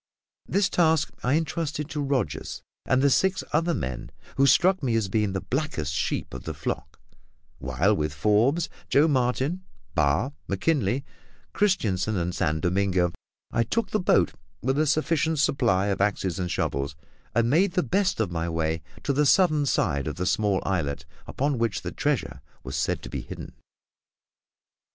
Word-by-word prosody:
This 200 Hz, -1 st, +2 dB
task 160 Hz, -3 st, +2 dB
I 130 Hz, +4 st, +2 dB
entrusted 155 Hz, -2 st, -2 dB
to 150 Hz, -, -2 dB
Rogers 125 Hz, -, -2 dB, 0.2 s
and 130 Hz, +1 st, +3 dB
the 140 Hz, -, +5 dB
six 190 Hz, +7 st, +2 dB
other 165 Hz, +2 st, +2 dB
men, 65 Hz, -2 st, -4 dB, 0.3 s
who 135 Hz, +1 st, +4 dB
struck 185 Hz, +8 st, +4 dB
me 125 Hz, -5 st, 0 dB
as 110 Hz, -3 st, +1 dB
being 105 Hz, -1 st, 0 dB
the 95 Hz, -, -2 dB
blackest 125 Hz, -, -2 dB
sheep 85 Hz, +3 st, -2 dB
of -, -, -7 dB
the -, -, -4 dB
flock; -, -, -5 dB, 0.6 s
while, 65 Hz, +11 st, +1 dB
with 75 Hz, -4 st, -1 dB
Forbes, 110 Hz, -, +2 dB, 0.2 s
Joe 145 Hz, +3 st, +5 dB
Martin, 130 Hz, +5 st, 0 dB, 0.3 s
Barr, 75 Hz, -, +1 dB
Mckinley, 125 Hz, -, 0 dB, 0.5 s
Christianssen, 110 Hz, -, +1 dB
and 90 Hz, 0 st, -1 dB
San 75 Hz, 0 st, 0 dB
Domingo, 90 Hz, 0 st, +1 dB, 0.4 s
I 115 Hz, -, +1 dB
took 220 Hz, -, -1 dB
the 215 Hz, -, +1 dB
boat, 180 Hz, -, +3 dB, 0.3 s
with 135 Hz, +3 st, +1 dB
a 155 Hz, -, +2 dB
sufficient 155 Hz, +1 st, +1 dB
supply 120 Hz, -9 st, +2 dB
of 100 Hz, -, -1 dB
axes 95 Hz, -4 st, 0 dB
and 90 Hz, -1 st, -2 dB
shovels, 70 Hz, -3 st, -2 dB, 0.4 s
and 115 Hz, 0 st, +3 dB
made 175 Hz, +9 st, +3 dB
the 180 Hz, -2 st, +2 dB
best 195 Hz, -, +1 dB
of 105 Hz, -6 st, 0 dB
my 85 Hz, 0 st, -2 dB
way 80 Hz, -1 st, -1 dB, 0.2 s
to 140 Hz, -, 0 dB
the 145 Hz, +1 st, +3 dB
southern 155 Hz, -2 st, +4 dB
side 70 Hz, -, +1 dB
of 75 Hz, -, -3 dB
the 90 Hz, -, -2 dB
small 100 Hz, 0 st, +1 dB
islet 80 Hz, -7 st, -1 dB, 0.2 s
upon 140 Hz, -2 st, -1 dB
which 115 Hz, -3 st, -1 dB
the -, -, -4 dB
treasure -, -, -1 dB, 0.2 s
was -, -, -5 dB
said -, -, -1 dB
to -, -, -7 dB
be -, -, -4 dB
hidden. -, -, -9 dB
120 Hz, 165 wpm, -26 LUFS, -, 0.6 s, the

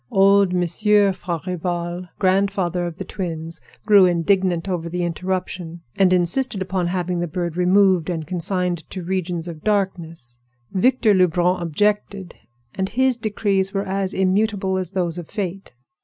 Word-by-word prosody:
Old 195 Hz, -1 st, +4 dB
Monsieur 195 Hz, +3 st, +2 dB
Farival, 175 Hz, 0 st, -4 dB
grandfather 190 Hz, -2 st, +1 dB
of 170 Hz, -1 st, -7 dB
the -, -, -4 dB
twins, 165 Hz, -3 st, -4 dB, 0.2 s
grew 205 Hz, -3 st, +7 dB
indignant 180 Hz, 0 st, +1 dB
over 170 Hz, -3 st, -2 dB
the 175 Hz, +1 st, -2 dB
interruption, 175 Hz, -1 st, -3 dB
and 190 Hz, -2 st, +4 dB
insisted 190 Hz, +6 st, +1 dB
upon 185 Hz, -1 st, -1 dB
having 180 Hz, 0 st, -2 dB
the 175 Hz, -, -1 dB
bird 170 Hz, 0 st, -3 dB
removed 185 Hz, -1 st, +3 dB
and 165 Hz, -3 st, -3 dB
consigned 180 Hz, +1 st, -1 dB
to 185 Hz, -, -6 dB
regions 180 Hz, -2 st, -2 dB
of 160 Hz, -3 st, -8 dB
darkness. 170 Hz, -, -2 dB, 0.3 s
Victor 225 Hz, +2 st, +3 dB
Lebrun 180 Hz, -1 st, +2 dB
objected; 200 Hz, +2 st, -1 dB, 0.4 s
and 190 Hz, 0 st, -2 dB
his 260 Hz, 0 st, +2 dB
decrees 200 Hz, -3 st, -1 dB
were 195 Hz, +1 st, 0 dB
as 195 Hz, 0 st, -1 dB
immutable 190 Hz, 0 st, +1 dB
as 185 Hz, -3 st, -2 dB
those 175 Hz, -3 st, -1 dB
of 170 Hz, -, -9 dB
Fate. 195 Hz, -1 st, -5 dB
185 Hz, 140 wpm, -21 LUFS, 175-195 Hz, 0.4 s, grew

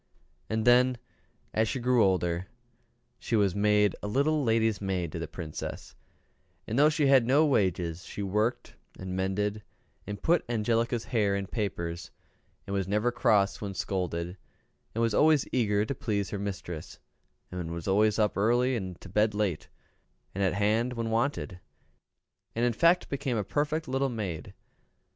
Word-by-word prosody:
And, 120 Hz, +3 st, +4 dB, 0.6 s
as 110 Hz, +1 st, +2 dB
she 130 Hz, -, -2 dB
grew 125 Hz, -1 st, +3 dB
older, 90 Hz, -1 st, +1 dB, 0.7 s
she 115 Hz, -, -2 dB
was 100 Hz, -4 st, +3 dB
made 105 Hz, 0 st, +3 dB
a -, -, -4 dB
little 145 Hz, +7 st, +1 dB
lady's 110 Hz, -3 st, +1 dB
maid 95 Hz, -4 st, -2 dB
to -, -, -5 dB
the -, -, -4 dB
Princess; 75 Hz, -2 st, -7 dB, 0.7 s
and 115 Hz, +5 st, -1 dB
though 150 Hz, +1 st, +7 dB
she 155 Hz, -1 st, +1 dB
had 135 Hz, -4 st, +5 dB
no 145 Hz, +5 st, +5 dB
wages, 90 Hz, -, 0 dB
she 100 Hz, -, -6 dB
worked 105 Hz, +5 st, -1 dB, 0.2 s
and 95 Hz, 0 st, -5 dB
mended 100 Hz, +3 st, -1 dB, 0.5 s
and 100 Hz, -1 st, -5 dB
put 170 Hz, +1 st, +2 dB
Angelica's 115 Hz, +1 st, 0 dB
hair 105 Hz, -5 st, +1 dB
in 100 Hz, 0 st, -2 dB
papers, 90 Hz, -5 st, -4 dB, 0.6 s
and 100 Hz, -, -5 dB
was 95 Hz, -2 st, -1 dB
never 105 Hz, +5 st, +1 dB
cross 105 Hz, -4 st, +2 dB
when 100 Hz, -2 st, -5 dB
scolded, 90 Hz, -1 st, -3 dB, 0.6 s
and 115 Hz, -, +1 dB
was 115 Hz, -2 st, +1 dB
always 150 Hz, +3 st, +4 dB
eager 105 Hz, -4 st, +2 dB
to 140 Hz, -, -2 dB
please 105 Hz, -5 st, -2 dB
her 100 Hz, -, -3 dB
mistress, 95 Hz, -5 st, -6 dB, 0.5 s
and 90 Hz, -2 st, -4 dB
was 85 Hz, -1 st, -6 dB
always 105 Hz, +2 st, +3 dB
up 105 Hz, -2 st, +2 dB
early 120 Hz, +5 st, +2 dB
and 95 Hz, -5 st, -5 dB
to -, -, -10 dB
bed 105 Hz, +3 st, +1 dB
late, 100 Hz, -7 st, -1 dB, 0.6 s
and 100 Hz, -, -1 dB
at 95 Hz, -, +1 dB
hand 110 Hz, +5 st, +1 dB
when 115 Hz, -2 st, -3 dB
wanted, 115 Hz, -6 st, -1 dB, 1.0 s
and 115 Hz, +1 st, +1 dB
in 120 Hz, -, +2 dB
fact 170 Hz, +9 st, +3 dB
became 135 Hz, -3 st, -2 dB
a 105 Hz, -, 0 dB
perfect 150 Hz, +7 st, -1 dB
little 135 Hz, +1 st, 0 dB
maid. 95 Hz, -, -5 dB
105 Hz, 160 wpm, -29 LUFS, 95-120 Hz, 1.0 s, though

